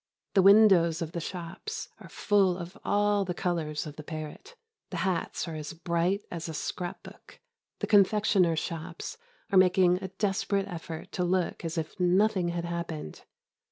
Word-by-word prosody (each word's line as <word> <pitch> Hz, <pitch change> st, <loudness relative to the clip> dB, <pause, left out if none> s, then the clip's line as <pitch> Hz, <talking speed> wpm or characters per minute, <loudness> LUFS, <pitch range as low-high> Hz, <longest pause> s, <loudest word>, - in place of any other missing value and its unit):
The 195 Hz, -, +5 dB
windows 190 Hz, -5 st, +6 dB
of 160 Hz, -, -6 dB
the 170 Hz, -, -3 dB
shops 180 Hz, -, -6 dB
are -, -, -12 dB
full 195 Hz, -4 st, +2 dB
of 175 Hz, 0 st, -8 dB
all 205 Hz, 0 st, +2 dB
the 180 Hz, -2 st, -4 dB
colours 165 Hz, -5 st, -2 dB
of 150 Hz, 0 st, -9 dB
the 155 Hz, -, -7 dB
parrot. 155 Hz, -, -8 dB, 0.3 s
The 180 Hz, -, -5 dB
hats 185 Hz, -1 st, -1 dB
are 165 Hz, -, -5 dB
as 155 Hz, 0 st, -6 dB
bright 170 Hz, +4 st, 0 dB
as 170 Hz, -1 st, -5 dB
a 160 Hz, -, -5 dB
scrap 175 Hz, +3 st, -4 dB
book. -, -, -14 dB, 0.4 s
The -, -, +1 dB
confectioners' 200 Hz, -4 st, +4 dB
shops 165 Hz, -, -5 dB, 0.3 s
are 190 Hz, -, +6 dB
making 180 Hz, -1 st, +4 dB
a 190 Hz, -, -3 dB
desperate 195 Hz, 0 st, -1 dB
effort 165 Hz, -3 st, -7 dB
to 180 Hz, -, -1 dB
look 180 Hz, 0 st, 0 dB
as 165 Hz, +1 st, -4 dB
if 160 Hz, +4 st, -4 dB
nothing 185 Hz, +1 st, +3 dB
had 170 Hz, 0 st, -2 dB
happened. 170 Hz, -, -5 dB
175 Hz, 165 wpm, -29 LUFS, 165-195 Hz, 0.4 s, windows